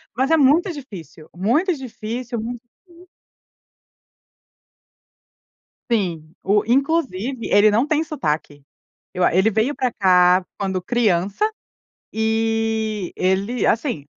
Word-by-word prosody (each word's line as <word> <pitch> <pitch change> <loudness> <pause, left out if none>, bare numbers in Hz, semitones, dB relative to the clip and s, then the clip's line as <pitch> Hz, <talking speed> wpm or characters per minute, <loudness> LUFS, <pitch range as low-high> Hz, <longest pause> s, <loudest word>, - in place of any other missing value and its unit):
mas 265 +5 0
é 325 - +5
muito 310 +7 +3
difícil, 180 - -11
muito 250 - +1
difícil, 240 -2 -6
muito 235 +2 -5 0.3
difiícil. 350 +1 -18 2.8
Sim, 170 -9 -2
o 205 +2 +2
inclusive, 265 - 0
ele 205 +1 +5
não 235 +7 +2
tem 310 +1 +1
sotaque. 155 - -3 0.5
Eu 180 -1 -1
a - - +3
ele 190 +5 +4
veio 220 +6 0
pra 260 -3 -1
cá 180 -1 +4
quando 190 -2 -2
criança 205 - +1 0.6
e 220 -2 -1
ele, 195 +6 0
assim, 225 - 0
220 Hz, 110 wpm, -21 LUFS, 190-260 Hz, 2.8 s, é